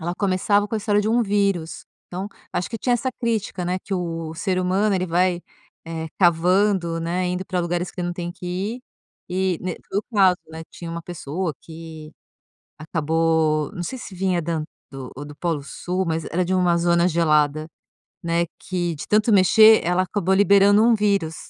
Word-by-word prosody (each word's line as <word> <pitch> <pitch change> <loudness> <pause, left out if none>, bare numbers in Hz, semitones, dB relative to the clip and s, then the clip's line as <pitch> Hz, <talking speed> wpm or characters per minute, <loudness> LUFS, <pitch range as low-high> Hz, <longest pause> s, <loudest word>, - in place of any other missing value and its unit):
ela 170 +2 -3
começava 200 +2 +1
com 220 - -4
a - - +1
história 205 0 +1
de 210 - -1
um 235 +1 +3
vírus, 195 -5 -1 0.2
então, 185 +2 -5 0.3
acho 180 - -2
que 230 - -5
tinha 245 +1 +1
essa 255 +2 -1
crítica, 220 -6 -2
né, 180 +1 -1
que 195 +1 -5
o 165 -3 -4
ser 185 +2 -1
humano 195 +3 +1
ele 185 -1 0
vai, 175 +1 +1 0.5
eh, 160 -1 -5
cavando, 175 0 +2
né, 175 +2 -1
indo 180 +1 -3
pra 180 -1 -1
lugares 175 +1 -2
que 180 - -6
não 175 0 -2
tem 175 0 -5
que 180 0 -10
ir. 200 +8 -3 0.5
Eh, 185 -1 0
ne 180 -2 -3 0.2
no 200 - 0
caso, 190 -3 +5
né, 160 0 -8
tinha 170 -1 -8
uma 170 0 -5
pessoa 170 0 -4
que, 160 -1 -10 0.7
acabou, 160 -1 0
não 175 - -5
sei 260 - -5
se 230 - -9
vinha 185 -1 0
da 165 0 -2
an 155 - -3 0.5
ou 145 +3 -7
do 145 0 -11
Polo 165 -3 -2
Sul 180 +6 -3
mas 160 -1 -1
era 180 +2 -1
de 185 - -1
uma 180 -2 +3
zona 170 0 +3
gelada, 155 -3 +2 0.6
né, 170 0 +1
que 175 -3 -2
de 145 - -8
tanto 215 +2 +3
mexer, 215 +3 +7
ela 180 +1 +2
acabou 190 0 0
liberando 200 +1 +5
um 235 - +5
vírus. 200 -7 0
180 Hz, 190 wpm, -22 LUFS, 165-195 Hz, 0.7 s, mexer